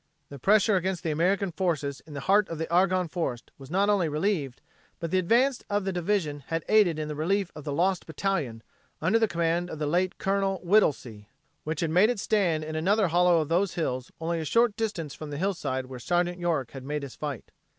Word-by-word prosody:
The 140 - -9
pressure 210 - +4
against 185 0 -2
the 160 - -1
American 185 +5 +1
forces 155 -6 -1
in 150 - -10
the 140 - -4
heart 200 +5 +3
of 165 - -4
the 160 +1 -3
Argonne 185 0 +3
Forest 155 -8 -4
was 135 -1 -11
not 195 +4 +2
only 195 -6 +2
relieved, 150 -4 -1 0.4
but 165 -1 -4
the 185 - +3
advance 240 +8 +2
of 205 -1 0
the 195 - -1
division 175 -5 -1
had 165 -1 -2
aided 205 -7 +4
in 155 -1 -3
the 150 - -4
relief 175 +5 0
of 150 - -10
the 145 - -3
"Lost 180 +5 0
Battalion" 160 - -2 0.4
under 185 +8 +2
the 225 - +3
command 170 0 0
of - - -6
the 150 - -2
late 180 +5 0
Col. 195 0 0
Whittlesey, 130 - +1 0.4
which 155 0 -2
had 165 -2 0
made 185 +7 +5
its 245 -5 -2
stand 175 -8 +1
in 155 0 -5
another 190 +4 +2
hollow 175 0 +4
of 155 - -4
those 180 +3 +1
hills 130 -6 -2
only 165 +1 -2
a - - -3
short 230 +6 +2
distance 185 -10 -3
from 155 - -8
the 145 - -5
hillside 160 -8 -2
where 130 -1 -9
Sergeant 175 +5 0
York 160 -9 -1
made 145 +2 -4
his 140 - -8
fight. 145 -6 -6
170 Hz, 215 wpm, -27 LUFS, 150-195 Hz, 0.4 s, made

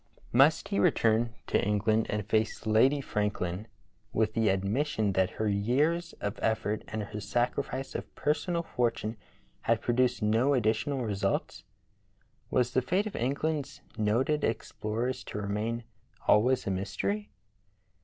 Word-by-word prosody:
Must 140 +6 +5
he 200 - 0
return 115 -8 +3
to - - +1
England 105 +2 +2
and 105 -1 -1
face 110 +1 0
Lady 130 +7 +4
Franklin 105 -4 -2 0.4
with 110 -1 +1
the 115 -1 +2
admission 105 +3 0
that 95 0 +2
her 110 - 0
years 130 +12 +1
of 100 +1 -4
effort 110 -1 0
and 110 -1 -3
her 105 +1 -6
sacrifice 125 +4 -1
of - - -6
personal 170 +3 0
fortune 115 -6 -1 0.5
had 115 -1 +2
produced 125 0 +1
no 115 +7 +3
additional 120 +3 0
results.? 100 -2 -2 0.8
Was 125 -1 +2
the 130 - +2
fate 185 - +1
of 215 - -5
England's 140 +3 -2
noted 120 +8 +1
explorers 115 +2 -2
to - - -6
remain 105 +3 -2 0.4
always 125 +5 +4
a 100 - 0
mystery? 200 - -2
115 Hz, 135 wpm, -29 LUFS, 105-135 Hz, 0.8 s, Must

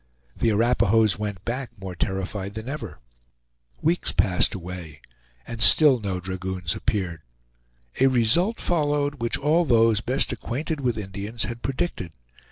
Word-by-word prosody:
The 115 - +1
Arapahoes 110 -1 +3
went 100 -3 -5
back 125 -2 -4
more 95 -1 -6
terrified 95 +2 -3
than 110 +2 -6
ever. 150 +3 -6 0.8
Weeks 170 +3 +2
passed 90 -2 +2
away, 85 -5 -8 0.5
and 115 -1 -7
still 140 +1 +6
no 95 -4 -3
dragoons 90 -2 -3
appeared. 90 -6 -2 0.8
A 135 - +5
result 130 - +2
followed 145 -4 0
which 115 - 0
all 155 +5 +2
those 115 -6 +3
best 130 +4 0
acquainted 145 +4 -4
with 120 -4 0
Indians 105 +3 -4
had 120 0 -4
predicted. 135 - -3
115 Hz, 135 wpm, -24 LUFS, 95-135 Hz, 0.8 s, still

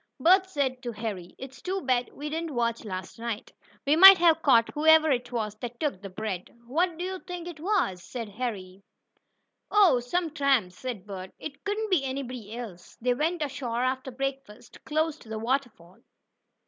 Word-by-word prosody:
Bert 375 +3 +5
did - - -22
say 285 -6 +1
to 245 -3 -4
Harry: 205 -5 -6
"It's 265 -2 -10
too 380 +1 -2
bad 250 -3 +1
we 295 - -7
didn't 320 -1 -4
watch 235 -1 0
last 185 -1 -6
night. 230 -2 -5 0.3
We 285 +2 +4
might 385 +3 +11
have 330 -2 +4
caught 230 -6 +4
whoever 315 0 +5
it 245 -1 -1
was 220 -4 -2
that 240 0 -7
took 285 -11 -2
the 200 - -7
bread." 190 -2 -5 0.2
"Who 335 +6 +1
do 350 - -4
you 375 0 -4
think 355 -2 -7
it 340 -3 -8
was?" 345 - 0 0.2
asked 230 -4 -4
Harry. 200 -5 -5 0.9
"Oh, 390 -11 +5
some 320 +7 -1
tramps," 270 - +1
said 240 -7 -5
Bert. 190 -2 -7
"It 285 -2 -9
couldn't 420 +1 -2
be 340 -7 +3
anybody 250 -5 -5
else." 205 -8 -9
They 245 +1 +1
went 320 +5 -1
ashore 255 -4 -3
after 260 +1 -1
breakfast, 270 -4 -6
close 315 0 0
to 225 - -15
the 220 - -4
waterfall. 225 -7 -3
260 Hz, 185 wpm, -27 LUFS, 225-315 Hz, 0.9 s, might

